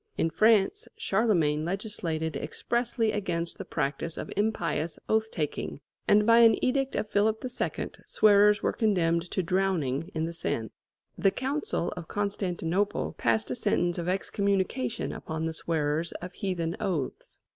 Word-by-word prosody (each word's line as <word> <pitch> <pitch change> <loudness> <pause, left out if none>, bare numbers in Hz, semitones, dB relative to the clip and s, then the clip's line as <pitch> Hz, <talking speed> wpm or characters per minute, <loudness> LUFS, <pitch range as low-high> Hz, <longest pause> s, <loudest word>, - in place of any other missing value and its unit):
In 165 - +1
France, 215 +1 +3
Charlemagne 175 -8 +2
legislated 170 -4 -3
expressly 225 - -1
against 170 -5 -2
the - - -5
practice 145 +4 -2
of - - -5
impious 170 -7 0
oath 220 0 +2
taking, 150 -5 -3 0.3
and 210 0 +5
by 230 +1 +6
an 230 -1 +7
edict 270 +1 0
of - - -1
Philip 215 +3 +1
II. 250 -1 -3 0.2
swearers 210 0 +5
were - - +1
condemned 175 -6 +1
to 190 - -1
drowning 170 -5 0
in 160 0 0
the 170 - -4
Seine. 115 -8 -2 0.5
The 195 - +5
Council 260 - -2
of 170 -2 -7
Constantinople 185 - -1
passed 115 0 +1
a - - -1
sentence 175 +6 +1
of 170 +1 -2
excommunication 190 - -1
upon 160 0 -4
the 165 - -2
swearers 160 0 -1
of 180 +1 -7
heathen 175 -4 -2
oaths. 180 -11 -3
180 Hz, 145 wpm, -28 LUFS, 160-210 Hz, 0.5 s, an